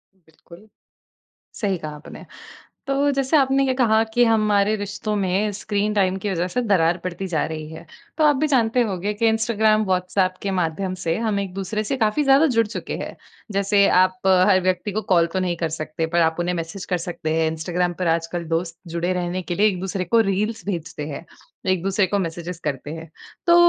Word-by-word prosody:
बिल्कुल। 170 +3 -18 0.9
सही 195 -3 -1
कहा 155 -1 -6
आपने। 150 - -11 0.6
तो 280 +1 +2
जैसे 275 +3 +2
आपने 270 -1 +3
ये 260 - +1
कहा 225 -3 +3
कि 245 0 +5
हमारे 215 -2 +3
रिश्तों 205 +1 -4
में 200 +2 0
स्क्रीन 210 +1 -1
टाइम 190 -2 +2
की 205 - 0
वज़ह 180 -1 -1
से 250 - -1
दरार 175 -6 +2
पड़ती 185 +1 -4
जा 150 - +2
रही 155 -1 -6
है। 165 +1 -10 0.3
तो 310 - +4
आप 295 -2 +5
भी 310 +3 +1
जानते 245 -2 +3
होंगे 195 +2 -2
कि 225 +2 +2
इंस्टाग्राम, 220 -1 +2
वॉट्सऐप 185 0 0
के 200 - -1
माध्यम 185 +1 -1
से 165 0 +1
हम 220 -3 0
एक-दूसरे 195 +3 -3
से 270 - -1
काफ़ी 220 +4 +1
ज़्यादा 275 +4 +5
जुड़ 230 -2 +4
चुके 215 - -5
हैं - - -7 0.4
जैसे 200 0 +3
आप 185 0 +3 0.3
हर 190 -2 +5
व्यक्ति 185 +2 0
को 215 +2 -2
कॉल 170 -1 +5
तो 190 - -1
नहीं 175 -2 -1
कर 165 -1 -1
सकते 155 +1 -3
पर 170 +1 +1
आप 160 0 +2
उन्हें 180 +1 0
मैसेज 165 +3 -5
कर 180 - +2
सकते 165 -2 -3
हैं। 160 - +2
इंस्टाग्राम 175 +2 -1
पर 180 - -1
आजकल 170 +1 -3
दोस्त 165 0 -2 0.2
जुड़े 175 +2 0
रहने 180 0 -2
के 175 0 -4
लिए 210 +4 +3
एक-दूसरे 185 0 -3
को 230 +6 +3
रील्स 210 +1 -2
भेजते 165 -5 -4
हैं। 145 +3 -7 0.5
एक-दूसरे 190 +2 +1
को 200 +2 0
मैसेजेस 170 -1 -4
करते 145 0 -3
हैं। 165 0 -9 0.4
तो 340 - +6
190 Hz, 200 wpm, -22 LUFS, 170-215 Hz, 0.9 s, तो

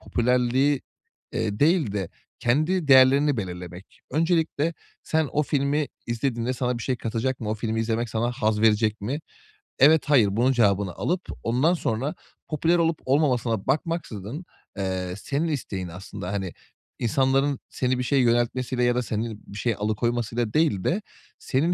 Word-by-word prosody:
popülerliği, 125 +3 +1 0.5
eee, 105 -2 -2
değil 155 - +3
de 95 -4 -2 0.3
kendi 155 +7 +1
değerlerini 135 +2 +6
belirlemek. 90 -2 -7
Öncelikle 165 +1 +1 0.3
sen 160 -2 0
o 150 - +2
filmi 145 0 0 0.2
izlediğinde 120 0 -1
sana 125 -1 -1
bir - - -6
şey 130 +1 -1
katacak 120 +3 -2
mı, 110 -2 -3
o - - 0
filmi 110 0 -2
izlemek 115 +1 -1
sana 115 +2 0
haz 110 -3 0
verecek 110 0 +3
mi? 130 +9 -3 0.6
Evet, 150 +3 +6
hayır. 120 -9 +5
Bunun 125 +3 +4
cevabını 100 -6 +2
alıp 180 +1 -1 0.2
ondan 130 +9 +2
sonra 135 -3 -2 0.3
popüler 165 +3 +2
olup 165 -1 +1
olmamasına 125 -6 +1
bakmaksızın, 145 - -2 0.3
eee, 95 -2 -2
senin 140 +10 -2
isteğin 105 - -3
aslında, 90 +1 -7
hani, 95 -3 -3 0.5
insanların 135 +3 +1
seni 130 0 0
bir - - 0
şeye 135 +1 +2
yöneltmesiyle 120 +1 +1
ya 120 0 +3
da 125 - 0
seni 110 -1 -3
bir 100 - -9
şeye 115 +1 0
alıkoymasıyla 115 +2 -1
değil 150 - +2
de 190 +6 0 0.4
senin 155 +7 +1
125 Hz, 150 wpm, -25 LUFS, 110-145 Hz, 0.6 s, değerlerini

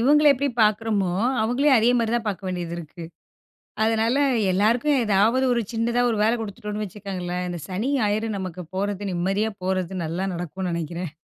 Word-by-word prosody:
இவுங்கள 295 +5 +4
எப்படி 280 +1 -1
பார்க்குறோமோ, 210 -3 +1 0.3
அவுங்களயும் 260 +5 +3
அதே 230 +1 +4
மாரி 230 -1 0
தான் 235 -2 -1
பார்க்க 195 -1 -4
வேண்டியதிருக்கு. 170 -2 -5 0.8
அதனால 225 +2 +2 0.4
எல்லாருக்கும் 235 +9 +2
ஏதாவது 220 +5 +3
ஒரு 240 - +1
சின்னதா 235 +1 0
ஒரு 225 - 0
வேலை 220 +2 +3
குடுத்துட்டோன்னு 210 0 -5
வச்சிக்கங்களேன், 185 -3 -5
இந்த 175 -1 -5
சனி, 200 +8 -2
ஞாயிறு 215 +1 0
நமக்கு 185 -2 -6
போறது 200 0 -2
நிம்மதியா 195 +5 0
போறது 185 0 -1
நல்லா 170 +4 -2
நடக்கும்னு 175 +2 -4
நெனைக்கிறேன். 170 0 -4
205 Hz, 150 wpm, -24 LUFS, 180-225 Hz, 0.8 s, இவுங்கள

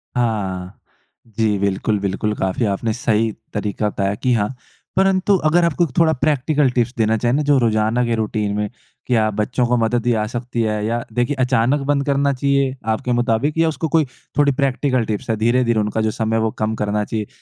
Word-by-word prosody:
हाँ। 100 -6 -2 0.5
जी, 110 -2 0
बिल्कुल, 100 +1 0
बिल्कुल, 100 +2 -1
काफ़ी 95 +5 -1
आपने 110 +2 -1
सही 115 -2 +1 0.2
तरीका 105 0 -1
बताया 100 0 -1
कि 125 +4 0
हाँ। 105 -2 +1 0.5
परंतु 195 +1 +3
अगर 175 +2 +3
आपको 170 +1 +1
एक 165 - 0
थोड़ा 160 -1 +4
प्रैक्टिकल 145 0 +1
टिप्स 120 0 0
देना 110 0 +2
चाहें 120 +2 0
ना 145 - +2
जो 140 - +5
रोज़ाना 110 +1 +1
के 115 - 0
रूटीन 105 -2 -1
में, 105 0 -1 0.4
क्या 110 -4 +2
बच्चों 115 +4 0
को 125 - +2
मदद 115 +1 0
ही 120 - +3
जा 110 -2 +1
सकती 120 0 -3
है 105 -1 -1
या 115 +1 -1
देखिए, 120 +4 0
अचानक 130 +2 +2
बंद 140 -1 +1
करना 140 0 +1
चाहिए 140 0 +1 0.2
आपके 125 +2 -3
मुताबिक 120 +5 +1
या 165 0 +3
उसको 160 +1 -2
कोई 155 0 +3 0.3
थोड़ी 145 -1 +4
प्रैक्टिकल 135 -3 0
टिप्स 105 +2 -4
है, 110 - +2
धीरे-धीरे 115 +1 +2
उनका 105 +1 -1
जो 110 0 +1
समय 110 +1 -1
है 115 - +2
वो 110 0 0
कम 110 +1 0
करना 105 0 -1
चाहिए? 105 -1 -3
115 Hz, 200 wpm, -20 LUFS, 110-135 Hz, 0.5 s, जो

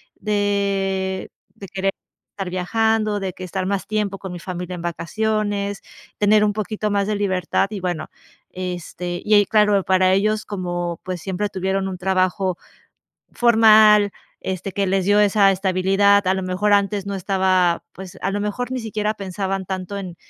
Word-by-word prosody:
de 195 -2 -1 0.2
de 195 - -10
querer 195 +1 -1 0.4
estar 195 -3 -5
viajando, 215 +3 0
de 190 -2 -4
que 185 - -9
estar 185 +1 -3
más 200 -1 -1
tiempo 210 -2 -2
con 190 -1 -8
mi 175 - -6
familia 180 0 -6
en 175 - -6
vacaciones, 205 +3 -2 0.4
tener 210 +1 +4
un 210 -1 +2
poquito 215 0 -3
más 200 -1 +1
de 210 +1 -1
libertad. 190 -2 0
Y 210 -2 -5
bueno, 175 -3 -3 0.4
este 180 -1 -5
y 215 - +1
ahí 205 - +6
claro, 210 -1 +3
para 185 0 +3
ellos, 215 +2 +1
como, 175 -3 -3
pues, 185 -2 -5
siempre 195 +2 -2
tuvieron 190 0 -1
un 185 -1 -5
trabajo 185 0 0 0.7
formal, 215 -3 +6 0.3
este, 190 +1 -4
que 195 +2 -1
les 190 0 0
dio 205 +1 +4
esa 205 -1 +5
estabilidad. 195 +1 +2
A 190 - +3
lo 190 - -3
mejor 185 +3 +1
antes 200 0 +1
no 200 - -3
estaba 185 -2 +1
pues, 190 -1 -11
a - - 0
lo 205 - -2
mejor 220 +5 -3
ni 260 - -2
siquiera 215 -2 -2
pensaban 195 -1 -3
tanto 190 +1 -4
en 185 -3 -6
195 Hz, 170 wpm, -21 LUFS, 185-205 Hz, 0.7 s, ahí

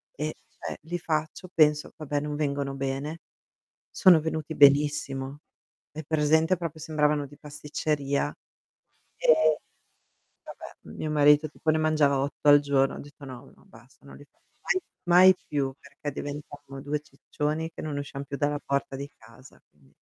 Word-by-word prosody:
e - - -3
cioè - - -8
li 175 +3 -4
faccio, 160 +2 -3
penso 150 -2 +3
vabbè 145 -2 -2
non 150 0 -4
vengono 140 -2 -1
bene, 135 +4 -4 0.7
sono 180 -4 +6
venuti 160 0 -4
benissimo. 140 -1 +3 0.5
Hai 155 0 -7
presente 160 +3 +2
proprio 165 -2 -5
sembravano 150 -2 +1
di 145 +1 -16
pasticceria, 150 -1 -2 0.9
ehm, 155 -1 +4 0.9
vabbè - - -11 0.2
mio 155 - -3
marito 150 +1 +5
tipo 155 +1 -2
ne 155 - +2
mangiava 155 -3 +2
8 140 +2 -2
al 145 0 +8
giorno. 140 -1 +1
Ho - - -7
detto: 145 0 -13
"No, 130 0 -10
no - - -24
basta 120 +3 -20
non - - -12
li 145 - -14
faccio - - -39
mai 375 - +1 0.2
mai 180 +2 +7
più, 140 -2 -1
perché 140 +1 -7
diventavamo 145 -1 -8
2 150 +1 -2
ciccioni 150 +2 -4
che - - -8
non 150 -2 -3
usciam 140 0 -6
più 140 0 -6
dalla 145 +2 0
porta 140 -1 -2
di 140 +1 -6
casa", 115 +4 -17
mh. 70 -3 -27
145 Hz, 155 wpm, -27 LUFS, 140-155 Hz, 0.9 s, al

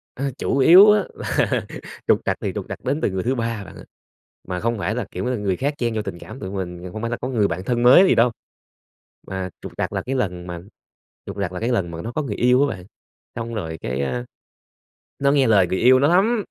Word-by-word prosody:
A, 140 +2 -2
chủ - - -1
yếu 185 +9 +8
á 210 -2 +3 0.3
là - - +2 0.5
trục - - +4
trặc - - 0
thì - - -2
trục - - -4
trặc - - -7
đến 145 +3 -1
từ - - +1
người 95 -1 -2
thứ 130 +3 0
3 115 -3 -3
bạn - - -12
ơi. - - -12 0.6
Mà 90 -1 -3
không 115 +3 -1
phải 105 +2 -2
là, 120 -4 -2
kiểu 90 - -4
là, 125 0 0
người 100 -3 -1
khác 145 +6 -1
chen 120 -2 -1
vô 110 - 0
tình 85 -4 -6
cảm 130 - -10
tụi 95 -2 -6
mình, 90 -2 -5
không 110 - -6
phải 115 +1 -3
là 120 - -2
có 125 - -2
người 110 -6 +1
bạn 90 - -4
thân 120 +3 -1
mới 135 +10 +8
gì - - +4
đâu. 120 +1 +4 1.0
Mà 95 -1 -4
trục - - -8
trặc - - -2
là - - -1
cái 130 +2 -3
lần 90 -8 -2
mà 85 -1 -6 0.7
trục - - -8
trặc 90 - -2
là 90 - -4
cái 115 - -1
lần 95 -9 0
mà 85 - -6
nó 115 - -5
có 155 - -1
người 105 -7 -4
yêu 125 +3 +3
á - - -3
bạn, 90 - -13 0.5
xong 115 0 -5
rồi 80 -6 -4
cái, 65 +2 -3
a, 65 -3 -2 0.9
nó 140 0 +3
nghe 135 -4 +3
lời 100 -5 +4
người 95 - -1
yêu 130 +2 +6
nó 140 - +4
lắm. 215 +3 +2
115 Hz, 260 wpm, -22 LUFS, 95-130 Hz, 1.0 s, yếu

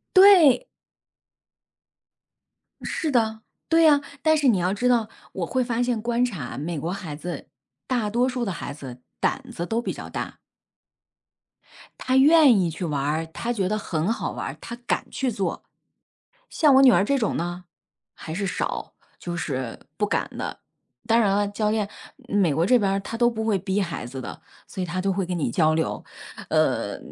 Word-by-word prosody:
对！ 375 - +7 2.2
是 315 -4 -2
的， 220 -3 +1 0.3
对 330 0 +5
呀， 295 -3 +6 0.2
但 315 0 +4
是 290 -2 +2
你 230 -6 +4
要 180 +1 0
知 245 +5 +1
道 230 -3 +2 0.2
我 180 - -2
会 255 +9 0
发 240 -1 -1
现 245 -3 -1
观 235 +2 0
察 180 - -5
美 155 +2 -3
国 165 +5 -3
孩 180 -6 -5
子， 165 0 -7 0.4
大 235 -5 0
多 240 +4 +2
数 250 -1 -2
的 200 - -2
孩 155 -4 -6
子 130 -4 -10 0.2
胆 - - 0
子 170 - -4
都 225 +5 -1
比 - - -3
较 - - -8
大。 - - -5 1.6
他 260 - 0
愿 285 -4 +7
意 175 -2 +1
去 170 +3 -5
玩， 150 +1 -1
他 235 - -3
觉 195 -5 0
得 215 - 0
很 170 -2 -1
好 230 - -2
玩 - - -5
儿， - - -7
他 235 - -7
敢 - - -1
去 265 -2 -1
做。 200 -3 -3 0.9
像 300 -4 +4
我 265 - +7
女 265 -2 +8
儿 185 -3 +4
这 280 +7 +1
种 220 -6 0
呢， 175 +1 -4 0.5
还 160 - -8
是 195 +4 -2
少， - - -3 0.3
就 175 -1 -5
是 130 -7 -4 0.2
不 - - +1
敢 - - -1
的。 - - -5 0.5
当 230 0 +4
然 210 -4 +3
了， 205 0 +1
教 210 +1 -1
练 215 -1 0 0.4
美 195 -7 +2
国 165 +4 +1
这 250 +6 +5
边 200 -4 +1
儿 195 - +1
他 225 +3 -6
都 240 0 +4
不 220 -2 -4
会 215 -3 +2
逼 190 +2 -1
孩 170 -8 -4
子 130 +2 -7
的， - - -8 0.3
所 190 - -6
以 - - -1
他 180 +1 -3
都 195 +1 +1
会 190 0 -1
跟 180 0 -3
你 155 - -1
交 155 +5 +3
流， 160 0 -1 0.5
呃， - - +1
205 Hz, 205 characters per minute, -24 LUFS, 170-245 Hz, 2.2 s, 女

